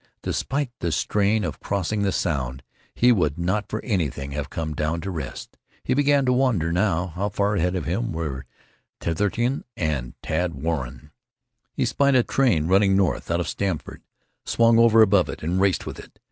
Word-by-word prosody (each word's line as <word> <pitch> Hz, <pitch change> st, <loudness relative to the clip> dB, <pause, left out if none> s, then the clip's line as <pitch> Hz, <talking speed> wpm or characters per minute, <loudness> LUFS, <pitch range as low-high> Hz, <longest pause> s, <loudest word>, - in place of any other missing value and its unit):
Despite 140 Hz, -1 st, -2 dB
the 85 Hz, -, -1 dB
strain 105 Hz, +6 st, +1 dB
of -, -, -4 dB
crossing 100 Hz, +1 st, -2 dB
the 100 Hz, -1 st, +1 dB
Sound, 65 Hz, -8 st, -2 dB, 0.3 s
he 125 Hz, +1 st, +5 dB
would 80 Hz, -, +1 dB
not 95 Hz, +5 st, -1 dB
for 110 Hz, -, -4 dB
anything 75 Hz, -, -2 dB
have 70 Hz, 0 st, -4 dB
come 80 Hz, -1 st, -4 dB
down 75 Hz, +2 st, -1 dB
to 95 Hz, -, -4 dB
rest. 80 Hz, -7 st, -7 dB, 0.3 s
He -, -, 0 dB
began 145 Hz, 0 st, +3 dB
to 125 Hz, -, +3 dB
wonder 115 Hz, -11 st, +1 dB
how 90 Hz, -2 st, 0 dB
afar 100 Hz, +1 st, 0 dB
ahead 90 Hz, +2 st, 0 dB
of 90 Hz, -6 st, -3 dB
him -, -, -1 dB
were 70 Hz, -5 st, -4 dB, 0.5 s
Titherington 105 Hz, -, -1 dB
and 70 Hz, -7 st, -2 dB
Tad 85 Hz, +2 st, -1 dB
Warren. 75 Hz, -3 st, -4 dB, 0.6 s
He -, -, +1 dB
spied 140 Hz, -1 st, +2 dB
a 125 Hz, -, +5 dB
train 115 Hz, -, +2 dB
running 95 Hz, +2 st, +4 dB
north 95 Hz, -3 st, 0 dB
out 85 Hz, +1 st, +1 dB
of -, -, -3 dB
Stamford, 95 Hz, -6 st, -3 dB, 0.4 s
swung 115 Hz, 0 st, +3 dB
over 115 Hz, -1 st, +7 dB
above 100 Hz, -3 st, +3 dB
it, -, -, -7 dB
and 90 Hz, +4 st, 0 dB
raced 95 Hz, -2 st, +2 dB
with -, -, -7 dB
it. -, -, -14 dB
95 Hz, 175 wpm, -24 LUFS, 80-110 Hz, 0.6 s, over